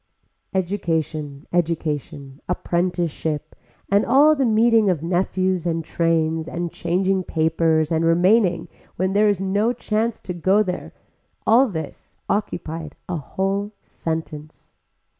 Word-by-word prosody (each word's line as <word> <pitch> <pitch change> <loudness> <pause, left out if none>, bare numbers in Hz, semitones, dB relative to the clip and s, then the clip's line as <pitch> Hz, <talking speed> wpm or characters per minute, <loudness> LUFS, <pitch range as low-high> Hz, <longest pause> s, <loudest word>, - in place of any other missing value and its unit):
Education, 160 -6 -2
education, 150 -5 -2
apprenticeship, 170 -4 -2 0.3
and 200 +2 +3
all 295 +3 +5
the 270 -3 +1
meeting 225 -1 +4
of 165 -4 0
nephews 185 0 0
and 165 -1 -1
trains 165 -1 0
and 170 0 -4
changing 185 +2 0
papers 160 -1 +1
and 165 0 +1
remaining 180 +3 +3 0.3
when 185 +2 0
there 210 +1 +4
is 200 -3 +1
no 205 +5 +1
chance 225 -1 -1
to 180 - -5
go 190 +5 +3
there, 180 -2 -5 0.5
all 245 +5 +5
this 160 - -7
occupied 165 -6 -3
a 180 - -2
whole 195 +7 -2
sentence. 155 -2 -6
175 Hz, 120 wpm, -22 LUFS, 160-200 Hz, 0.5 s, all